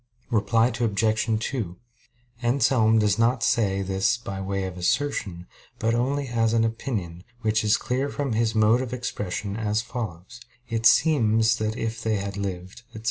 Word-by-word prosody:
Reply 115 +1 +3
Obj. 110 0 +1
2: 105 -10 -4 0.6
Anselm 120 -2 +3
does 105 -1 +2
not 120 +1 +2
say 100 -4 +1
this 95 +5 +1
by 100 -5 -6
way 95 0 -2
of 95 -1 -5
assertion, 90 -2 -1 0.3
but 115 +1 0
only 135 +4 0
as 115 -2 +1
an 115 -1 +3
opinion, 110 -7 -3 0.2
which 110 -1 +1
is 105 0 +3
clear 130 +3 -2
from 140 -4 -2
his 110 0 0
mode 110 +3 +4
of 125 -1 -5
expression 105 -5 -4
as 110 0 -1
follows: 115 -2 -7 0.3
"It 115 -1 +2
seems 115 -8 +4
that 110 +1 -2
if 115 0 -3
they 110 -1 0
had 100 -1 -4
lived, 95 0 -5
etc." 110 - -10
110 Hz, 160 wpm, -25 LUFS, 100-120 Hz, 0.6 s, mode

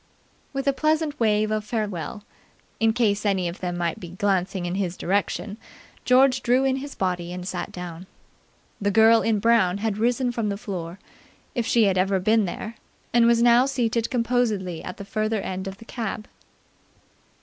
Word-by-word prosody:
With 275 0 -3
a 275 - +4
pleasant 310 +1 0
wave 215 -1 +2
of 215 -1 0
farewell, 210 -4 -4 0.6
in 225 0 +4
case 215 -3 +1
any 195 -4 +1
of 170 +2 -6
them 175 -1 -3
might 170 -2 -2
be 175 - -8
glancing 190 0 -1
in 175 - -2
his 185 -2 -2
direction, 200 +2 -1 0.5
George 255 +1 +4
drew 250 +2 +3
in 265 -1 +1
his 280 +1 -7
body 180 -2 -2
and 180 0 -6
sat - - -4
down. 180 0 -8 0.7
The 200 - +1
girl 225 +2 +6
in 225 -1 +1
brown 205 -4 +3
had 215 0 -2
risen 245 +2 +1
from 230 -3 -2
the 200 - -2
floor, 185 -5 -6 0.6
if 240 -3 -1
she 235 - +4
had 190 -3 +2
ever 190 +1 +2
been 215 +3 +3
there, 215 +5 -6 0.4
and 235 -1 +5
was 235 0 +4
now 240 +2 +5
seated 235 -4 0
composedly 230 -8 0
at 180 - -7
the 200 - -8
further 215 +2 -1
end 190 0 -4
of 195 0 -6
the 225 - -14
cab. 220 -3 -5
215 Hz, 180 wpm, -24 LUFS, 185-235 Hz, 0.7 s, girl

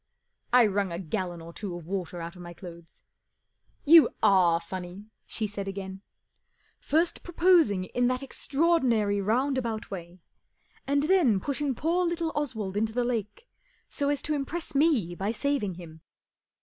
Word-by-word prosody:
I 245 -1 +6
wrung 200 -2 0
a 170 - -3
gallon 175 0 -4
or 165 +1 -10
two 195 -2 -5
of 175 -2 -9
water 180 -1 -4
out 170 +1 -7
of 180 - -11
my 175 0 -9
clothes. 170 -2 -12 0.4
" - - -42
You 330 -2 +9
are 175 -4 +5
funny 175 +1 -7
1 210 +3 -13
" - - -50
she 220 - -2
said 200 -1 -5
again, 190 -1 -6 0.4
" - - -50 0.3
First 330 +3 0
proposing 335 - +3
in 245 +5 0
that 255 +2 -1
extraordinary 260 -9 +1
roundabout 235 +1 -1
way, 175 -1 -8 0.7
and 285 +1 +2
then 305 - +3
pushing 280 +3 -2
poor 335 +7 +1
little 340 -2 -1
Oswald 220 -10 -3
into 220 +1 0
the 245 +1 +1
lake 230 - -3 0.4
so 285 0 -1
as 290 -1 -1
to 305 - -1
impress 310 +3 -3
me 275 - +2
by 195 +4 -2
saving 235 -6 -1
him." 160 -2 -12
215 Hz, 165 wpm, -27 LUFS, 185-285 Hz, 0.7 s, You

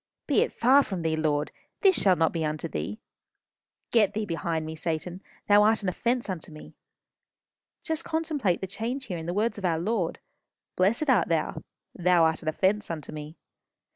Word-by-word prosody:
Be - - +3
it - - +1
far 260 +4 +5
from 190 -10 -4
thee, 160 -1 +1
Lord. 150 -1 0 0.3
This 385 -2 +5
shall 190 -2 +4
not 165 -2 +2
be 165 -2 -1
unto 155 0 -2
thee.... 80 +7 -4 0.9
Get 215 -4 +3
thee 215 0 -1
behind 165 -2 -2
me, 160 0 -6
Satan. 170 +3 -4 0.3
Thou 205 0 +6
art 215 0 +4
an 190 - +1
offence 240 +6 -1
unto 180 -5 -5
me.' 155 - -12 1.1
Just 320 0 -2
contemplate 310 - -1
the - - -2
change 235 +7 -4
here 180 -7 -4
in 160 - -7
the - - -1
words 215 +1 0
of 195 - -4
our 165 -2 +2
Lord. 180 0 -1 0.6
'Blessed 215 +11 +2
art 235 -11 +4
thou.' 160 -1 -1 0.3
'Thou 180 -1 +3
art 160 -1 +2
an 160 - -10
offence 195 +6 +1
unto 160 -3 -5
me. 150 +1 -8
180 Hz, 185 wpm, -27 LUFS, 160-220 Hz, 1.1 s, Thou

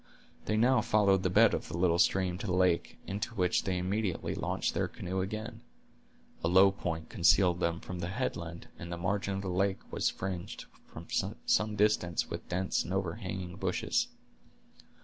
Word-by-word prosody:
They 110 - 0
now 125 +1 +4
followed 100 -3 +3
the 95 - +1
bed 90 - +5
of - - -2
the 80 - -5
little 85 -1 +2
stream 90 -1 +2
to 105 - -4
the 90 - 0
lake, 90 -2 +1
into 105 +5 -4
which 90 -3 +1
they 95 -1 0
immediately 95 +1 -1
launched - - -1
their - - 0
canoe 95 +1 -4
again. 110 +3 -5 0.8
A - - +2
low 95 +3 +6
point 80 -4 -4
concealed 90 -2 +4
them 85 -1 0
from 90 -1 -7
the 85 - -3
headland, 85 -6 -4
and 85 0 -7
the 85 - -3
margin 100 +2 -1
of 95 - -3
the - - -4
lake 95 +2 +1
was - - +1
fringed 90 -2 -5 0.2
for - - -10 0.4
some 105 0 +2
distance 105 -5 +1
with - - -6
dense 95 +2 0
and - - -7
overhanging 90 -1 -3
bushes. - - 0
95 Hz, 175 wpm, -31 LUFS, 90-100 Hz, 0.8 s, low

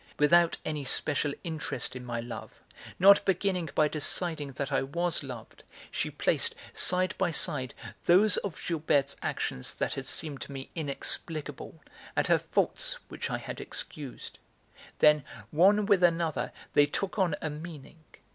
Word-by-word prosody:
Without 170 +3 +4
any 150 -2 -3
special 145 +2 +2
interest 155 -7 -3
in 125 - -7
my 120 -1 -4
love, 120 +1 -8 0.4
not 200 +2 +7
beginning 185 -3 0
by 155 - +4
deciding 150 -1 -2
that 140 +2 -4
I 135 - +2
was 170 +5 -1
loved, 125 -6 -9 0.3
she - - -2
placed, - - 0 0.2
side 185 +1 +4
by 190 -2 +2
side, 130 -5 +1 0.3
those 200 +5 +5
of 195 -5 -3
Gilberte's 145 -4 0
actions 65 - -3
that - - -1
had - - -5
seemed 145 -5 -1
to - - -7
me 135 -1 -8
inexplicable 155 0 -2 0.3
and - - +2
her - - +4
faults - - 0
which - - -5
I - - -1
had - - -7
excused. 140 -5 -5 0.6
Then, 150 -1 +5 0.3
one 200 +6 +4
with 200 -3 +3
another, 170 -2 +1 0.2
they 145 0 +5
took 195 +7 -3
on 175 -5 +2
a 155 - -3
meaning. 155 0 -10
155 Hz, 150 wpm, -29 LUFS, 140-175 Hz, 0.6 s, not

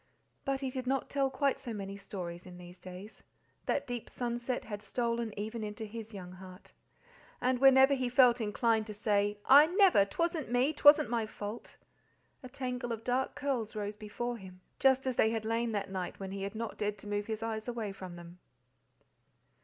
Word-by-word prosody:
But 275 0 -1
he 265 -1 -2
did 255 -1 -4
not 270 +1 -1
tell 275 -1 +1
quite 275 +1 0
so 235 -3 -5
many 195 -1 -5
stories 180 -3 -7
in 180 -1 -10
these 180 0 -12
days; 185 +4 -10 0.5
that - - 0
deep 245 -2 -5
sunset 240 +1 -3
had 205 -2 -6
stolen 235 +1 -1
even 220 +2 -4
into 210 +1 -5
his 225 +1 -8
young 185 -4 -8
heart, 185 0 -12 0.7
and 255 -1 +1
whenever 270 +1 +7
he 255 -2 0
felt 245 -1 +5
inclined 220 +1 +1
to 210 - -7
say 205 -1 +1
"I 285 +3 +8
never, 365 - +5
'twasn't 330 - -2
me, 255 +5 +2
'twasn't 290 -6 +6
my 230 -2 0
fault," 210 +2 -7 0.6
a 255 - -9
tangle 250 -2 -4
of 225 -1 -4
dark 255 +2 0
curls 250 -6 -2
rose 205 0 -3
before 235 +3 -4
him, 185 -3 -12 0.2
just 265 0 +4
as 260 -2 -1
they 220 - +5
had 225 -1 -2
lain 230 +1 0
that 200 -2 -2
night 185 -2 -4
when 195 -1 -5
he 195 0 -5
had 200 +2 -4
not 230 0 -5
dared 210 0 -1
to 200 - -9
move 205 0 -2
his 220 0 -3
eyes 220 0 -3
away 230 -4 -3
from 185 -2 -9
them. 175 +1 -12
225 Hz, 190 wpm, -32 LUFS, 205-255 Hz, 0.7 s, I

